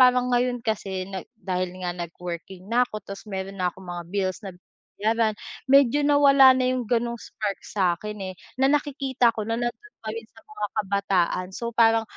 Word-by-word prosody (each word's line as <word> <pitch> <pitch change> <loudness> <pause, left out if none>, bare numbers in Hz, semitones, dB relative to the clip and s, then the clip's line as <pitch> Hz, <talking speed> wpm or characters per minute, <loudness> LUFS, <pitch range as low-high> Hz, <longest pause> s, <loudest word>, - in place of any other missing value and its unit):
Parang 250 0 +5
ngayon 245 0 +1
kasi 195 -4 -2
na 190 -1 -4 0.2
dahil 185 -3 -3
nga 175 - -1
nag-working 175 +1 -7
na 245 +2 +4
ako 215 - -7
tapos 200 +2 -8
mayro'n 195 0 -5
na 180 - +2
akong 190 - -14
mga 175 -1 -5
bills 190 +1 -1
na 190 - -6 0.4
binabayaran, 220 +1 +1 0.3
medyo 275 0 +5
nawala 280 -2 +7
na 255 -1 +2
'yong 255 -2 -1
gano'ng 235 -1 0
spark 205 -3 -4
sa'kin, 200 +2 -1 0.2
eh, - - -17 0.3
na 270 - +5
nakikita 275 -4 +1
ko 215 - -2
na 225 +1 -1
nando'n 325 - -4
pa - - -4
rin 225 0 -7
sa 225 - -18
mga 210 -1 -4 0.2
kabataan. 195 -2 +1
So, 235 0 -3
parang 225 -1 +4
220 Hz, 180 wpm, -25 LUFS, 190-245 Hz, 0.4 s, nawala